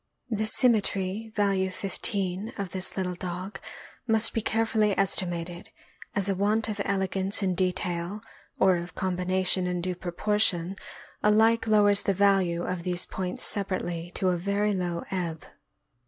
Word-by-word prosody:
The 215 Hz, 0 st, 0 dB
symmetry 215 Hz, -3 st, +2 dB
(value 195 Hz, -2 st, +1 dB
15) 195 Hz, +1 st, -1 dB
of 200 Hz, -4 st, -4 dB
this 185 Hz, +1 st, -4 dB
little 185 Hz, -1 st, -1 dB
dog 185 Hz, +2 st, -6 dB, 0.5 s
must 220 Hz, -1 st, +3 dB
be 225 Hz, -, 0 dB
care 225 Hz, +1 st, +1 dB
fully 215 Hz, -3 st, +1 dB
estimated, 175 Hz, -3 st, 0 dB, 0.5 s
as 200 Hz, -2 st, 0 dB
a 200 Hz, -, +2 dB
want 210 Hz, +4 st, +1 dB
of 210 Hz, -1 st, -3 dB
elegance 195 Hz, +1 st, +1 dB
in 185 Hz, -1 st, +1 dB
detail, 180 Hz, +1 st, -2 dB, 0.4 s
or 190 Hz, -2 st, +4 dB
of 175 Hz, +1 st, -7 dB
com 185 Hz, -1 st, -1 dB
bination 185 Hz, 0 st, +1 dB
in 180 Hz, 0 st, -1 dB
due 180 Hz, +1 st, -2 dB
proportion, 180 Hz, 0 st, 0 dB, 0.5 s
alike 225 Hz, +2 st, +3 dB
lowers 205 Hz, -2 st, +4 dB
the 195 Hz, -, 0 dB
value 190 Hz, -3 st, +2 dB
of 180 Hz, -1 st, -3 dB
these 180 Hz, 0 st, -1 dB
points 185 Hz, -1 st, -4 dB
separately 175 Hz, -4 st, -1 dB
to 185 Hz, -, +1 dB
a 180 Hz, -, +1 dB
very 200 Hz, +3 st, 0 dB
low 175 Hz, -3 st, -2 dB
ebb. 170 Hz, -4 st, -3 dB
190 Hz, 150 wpm, -27 LUFS, 180-205 Hz, 0.5 s, or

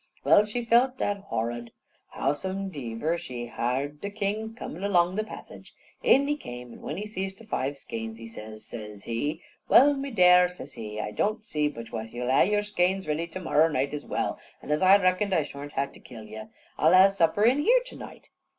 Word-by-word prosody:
Well, 210 Hz, -, +6 dB
she 235 Hz, +3 st, -4 dB
felt 250 Hz, +3 st, +3 dB
that 200 Hz, -3 st, -2 dB
horrud. 120 Hz, +1 st, -3 dB, 0.4 s
Howsomediver, 155 Hz, -3 st, -2 dB
she 120 Hz, -4 st, -6 dB
hard 135 Hz, +5 st, -2 dB
the 200 Hz, -, -3 dB
king 205 Hz, +1 st, -2 dB
a 225 Hz, +1 st, -10 dB
comin' 175 Hz, +5 st, -6 dB
along 180 Hz, -3 st, +3 dB
the 215 Hz, -, 0 dB
passage. 215 Hz, -, -11 dB, 0.3 s
In 280 Hz, -, +4 dB
he 295 Hz, -, +1 dB
came, 125 Hz, -, -9 dB
an' -, -, -13 dB
when 150 Hz, -, -5 dB
he 205 Hz, -, -4 dB
see 195 Hz, -2 st, -3 dB
the 195 Hz, +4 st, -14 dB
five 140 Hz, -9 st, -2 dB
skeins, 115 Hz, -4 st, -6 dB
he 115 Hz, -, -10 dB
says, 110 Hz, -1 st, -10 dB
says 105 Hz, -3 st, -8 dB
he: 145 Hz, +8 st, -3 dB, 0.3 s
"Well, 285 Hz, +3 st, +7 dB
me 275 Hz, 0 st, -4 dB
dare," 180 Hz, -5 st, +6 dB
says 180 Hz, -6 st, -10 dB
he, 105 Hz, -1 st, -6 dB
"I 105 Hz, -, -3 dB
don't 215 Hz, -, -1 dB
see 150 Hz, -8 st, 0 dB
but 115 Hz, -6 st, -7 dB
what 115 Hz, -1 st, -6 dB
yew'll 125 Hz, +1 st, -2 dB
ha' 135 Hz, -, +5 dB
your 210 Hz, 0 st, +2 dB
skeins 190 Hz, -2 st, 0 dB
ready 155 Hz, +3 st, -1 dB
to 180 Hz, +2 st, -7 dB
morrer 160 Hz, -2 st, +3 dB
night 140 Hz, -2 st, -1 dB
as 150 Hz, -, -4 dB
well, -, -, -2 dB, 0.2 s
an' -, -, -5 dB
as 150 Hz, -, +1 dB
I 190 Hz, +1 st, +7 dB
reckon 185 Hz, +1 st, +1 dB
I 165 Hz, -4 st, +3 dB
shorn't 145 Hz, 0 st, -9 dB
ha' 140 Hz, 0 st, -1 dB
to -, -, -14 dB
kill 115 Hz, -2 st, -11 dB
you, 110 Hz, +1 st, -9 dB, 0.3 s
I'll 160 Hz, +4 st, +5 dB
ha' 190 Hz, +1 st, +7 dB
supper 195 Hz, +1 st, +2 dB
in 250 Hz, +5 st, +4 dB
here 485 Hz, +11 st, +4 dB
to -, -, -10 dB
night." -, -, -11 dB
165 Hz, 215 wpm, -27 LUFS, 125-205 Hz, 0.4 s, Well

